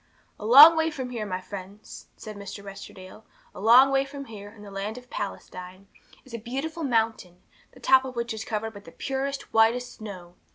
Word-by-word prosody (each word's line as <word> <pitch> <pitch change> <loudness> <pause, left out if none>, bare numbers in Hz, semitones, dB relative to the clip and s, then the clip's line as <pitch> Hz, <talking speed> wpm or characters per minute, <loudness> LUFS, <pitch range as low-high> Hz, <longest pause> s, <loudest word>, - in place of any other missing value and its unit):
'A 210 - -7
long 295 +7 +10
way 320 0 +1
from 260 -5 -6
here, 220 -4 -4
my 185 -1 -3
friends,' 195 +2 -10
said 215 -1 -9
Mr. 200 0 -9
Westerdale, 195 0 -11 0.3
'a - - -11
long 250 +5 +7
way 270 0 +3
from 275 0 -9
here, 205 -4 -10
in 210 0 -15
the 200 - -11
land 200 +4 -5
of 250 0 -13
Palestine, 185 -1 -7 0.4
is 260 - -16
a 230 - -4
beautiful 275 +9 -5
mountain, 225 - -1 0.3
the - - -16
top 265 0 +5
of 260 -1 -7
which 235 0 -3
is 220 0 -6
covered 220 0 -4
with 205 -1 -13
the - - -12
purest, 270 +1 -4
whitest 230 +3 +2
snow. 185 -5 -9
225 Hz, 200 wpm, -26 LUFS, 200-260 Hz, 0.4 s, long